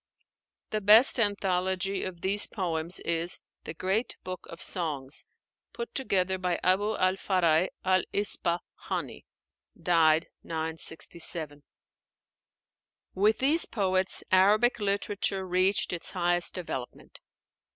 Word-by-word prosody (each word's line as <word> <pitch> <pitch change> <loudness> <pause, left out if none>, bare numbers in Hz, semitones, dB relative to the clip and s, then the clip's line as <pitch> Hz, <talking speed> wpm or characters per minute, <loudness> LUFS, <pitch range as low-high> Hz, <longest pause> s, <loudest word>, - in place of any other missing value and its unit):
The 215 - -1
best 220 +6 +7
anthology 190 -2 0
of 175 -2 -6
these 200 +2 +1
poems 170 -3 -2
is 170 +1 -2 0.3
'The 160 - -6
Great 195 +8 -1
Book 185 0 -7
of 165 - -10
Songs,' 150 -6 -3 0.5
put 235 0 -6
together 190 -7 0
by 180 -2 -1
Abu 205 +4 +2
al 185 +1 +1
Fáraj 180 -3 +2 0.2
al 185 0 +3
Ispa 175 -4 +1 0.3
háni - - -4 0.5
(died 160 -2 +3 0.2
967). 160 -1 -3 1.5
With 210 +3 +2
these 295 +6 +3
poets 190 -3 0
Arabic 210 +6 +4
literature 200 -1 -1
reached 185 +2 +2
its 170 - +1
highest 175 -1 +1
development. 135 -8 -7
185 Hz, 110 wpm, -28 LUFS, 170-200 Hz, 1.5 s, best